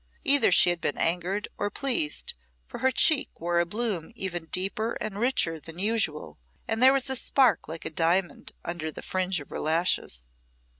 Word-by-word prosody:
Either 280 -6 +4
she 175 - +7
had 175 - -4
been 145 - -2
angered 180 +5 -1
or 205 - -1
pleased, 220 - 0 0.3
for - - -9
her 260 - +3
cheek 290 +2 +4
wore 170 +1 0
a 170 - +1
bloom 210 -4 -3
even 175 -6 -4
deeper 195 +6 -1
and 210 -1 -5
richer 210 -10 +1
than 165 +2 -8
usual, 200 - -1 0.3
and 225 +1 -2
there 260 +1 +8
was 275 0 +1
a 265 - 0
spark 255 -1 +2
like 160 +1 -8
a - - -2
diamond 170 +1 0
under 165 -2 -4
the - - -9
fringe 185 -1 -1
of 145 - -12
her - - -6
lashes. 155 - 0
185 Hz, 185 wpm, -26 LUFS, 165-225 Hz, 0.3 s, there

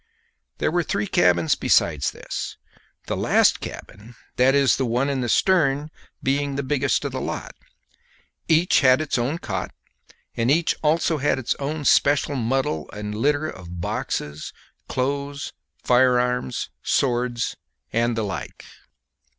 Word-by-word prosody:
There - - 0
were 175 +1 +2
three 105 -10 -1
cabins 85 -4 +3
besides 75 -4 +2
this; - - -6 0.5
the - - -2
last - - +3
cabin, 110 +4 -9 0.2
that 130 +2 +4
is 140 -2 +4
the 130 - 0
one 125 +5 +1
in 135 -2 -1
the 120 - -2
stern, 150 -3 +2 0.3
being 140 +1 0
the 140 - -2
biggest 140 0 0
of - - -2
the - - -4
lot. - - -5 0.9
Each 165 +2 +4
had 130 -1 +5
its 155 -5 -1 0.2
cot, - - -3 0.7
and 115 +1 0
each 160 +4 +3
also 160 0 +1
had 145 +1 +1
its 130 -2 -1
own 145 +1 -3
special 145 +1 +3
muddle 120 - -1
and 105 0 -5
litter 145 +7 +1
of 90 - -8
boxes, 75 -2 -4 0.3
clothes, 140 +2 -3 0.3
firearms, 125 - +2
swords, 120 -2 0 0.4
and 115 0 +1
the 110 - 0
like. 100 -2 -6
130 Hz, 135 wpm, -23 LUFS, 115-145 Hz, 0.9 s, had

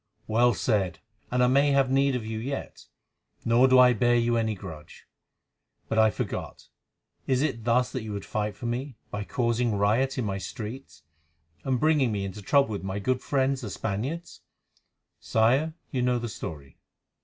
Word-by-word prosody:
"Well 120 +2 +3
said, 100 -7 0 0.3
and 125 0 +2
I - - +5
may 140 +3 +4
have 135 -1 +3
need 135 0 +3
of 120 -3 -3
you 110 0 -4
yet, 135 +4 -6 0.6
nor 120 +3 +5
do 130 0 +5
I 125 -1 +7
bear 120 +2 +3
you 120 0 +2
any 110 -2 0
grudge. 80 -6 -11 0.8
But, 110 - +1
I 110 0 +6
forgot, - - -5 0.6
is 130 0 +2
it 120 -7 -2
thus 125 +1 +2
that 130 - -3
you 110 -1 -6
would 100 - -5
fight 105 -2 -2
for 110 - -9
me, 125 +3 -3 0.2
by 105 - -3
causing 120 -1 0
riot 115 +7 +1
in 125 - -1
my 95 -1 -2
streets, 110 - -8 0.6
and 130 -2 0
bringing 150 -5 +3
me 100 -2 -2
into 100 +2 -7
trouble 140 +5 +3
with 100 -3 -4
my 95 +1 -3
good 130 +5 0
friends 135 -1 0
the 110 - -5
Spaniards?" 120 - -4 0.8
"Sire, 130 +8 +2 0.2
you 130 - -1
know 125 0 +2
the 120 -1 -4
story." 70 - -8
120 Hz, 180 wpm, -27 LUFS, 105-130 Hz, 0.8 s, I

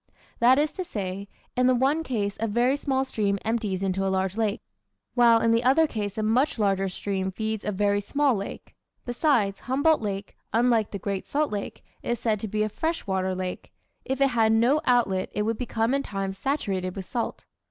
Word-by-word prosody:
That 250 +3 +6
is 300 +1 +2
to 370 - -4
say, 200 - -5 0.3
in 250 0 +3
the 255 - +4
one 275 +6 +2
case 210 -9 -2
a 225 - 0
very 240 +5 +2
small 270 -2 0
stream 205 -5 0
empties 215 -4 -1
into 195 0 0
a 195 - +1
large 190 0 0
lake, 215 -2 -1 0.5
while 235 -2 +5
in 230 - +2
the 230 +1 +3
other 275 +6 +5
case 210 -7 -4
a 215 - 0
much 245 +7 +2
larger 195 -2 +1
stream 190 0 -2
feeds 220 +2 -3
a 210 - -1
very 205 +1 +1
small 280 +6 +1
lake. 200 -2 -6 0.3
Besides, 240 -6 +1
Humboldt 285 +4 +2
Lake, 200 -2 -4 0.2
unlike 230 -2 +3
the 200 - -5
Great 195 0 -4
Salt 300 +1 0
Lake, 205 -1 -5 0.2
is 240 -1 -2
said 220 -3 0
to 220 - -4
be 215 +1 0
a - - +1
fresh 320 +10 -2
water 190 -1 -1
lake; 185 0 -5 0.3
if 265 0 -3
it 275 0 +4
had 225 -3 +3
no 245 +7 +3
outlet 215 -7 +2
it 210 - +1
would 225 +1 -1
become 235 -1 0
in 275 - +2
time 195 -6 -3
saturated 195 -6 -2
with 190 - -5
salt. 235 +4 -4
220 Hz, 205 wpm, -26 LUFS, 195-255 Hz, 0.5 s, That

